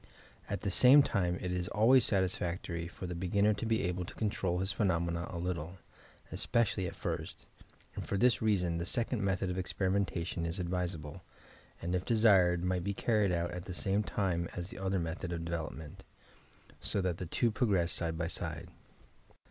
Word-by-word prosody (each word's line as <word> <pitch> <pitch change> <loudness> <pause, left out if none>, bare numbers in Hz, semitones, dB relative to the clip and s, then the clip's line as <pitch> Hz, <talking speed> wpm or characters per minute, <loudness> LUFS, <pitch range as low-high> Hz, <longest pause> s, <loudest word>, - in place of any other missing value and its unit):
At 100 -1 -3
the 100 - -1
same 130 +7 +7
time 90 -7 0
it 90 - -2
is 90 -1 -2
always 120 +4 +5
satisfactory 85 -3 -1
for 90 - -8
the 90 - -4
be 90 +2 -3
ginner 100 +3 +3
to 105 +2 -4
be 110 0 +1
able 90 0 -1
to - - -10
control 95 -4 -1
his 95 +2 0
phenomena 85 -4 0
a 85 - -5
little, 90 0 -3 0.5
especially 105 -5 +1
at - - -7
first, - - -5 0.5
and - - -4
for 100 - -2
this 125 +3 +3
reason 90 -6 +1
the 85 - -2
second 120 -1 0
method 95 -1 0
of 90 - -3
experimentation 95 -2 -1
is 85 +3 -2
advisable, 85 -2 -3 0.6
and 85 +2 -2
if 90 0 0
desired 95 -7 +4
might 90 -1 0
be 100 +1 -2
carried 105 -4 +2
out 85 0 -1
at 90 0 -6
the 90 - -6
same 100 +3 +1
time 90 -5 -1
as 90 +1 -5
the 115 - -9
other 95 0 0
method 85 +1 -3
of 85 -1 -3
development, 80 -2 -5 0.8
so - - +1
that 90 -3 -1
the 90 - -4
two 115 +7 +1
progress 100 -7 +2
side 80 -1 -1
by 85 - -1
side. 85 - -2
90 Hz, 185 wpm, -32 LUFS, 85-100 Hz, 0.8 s, same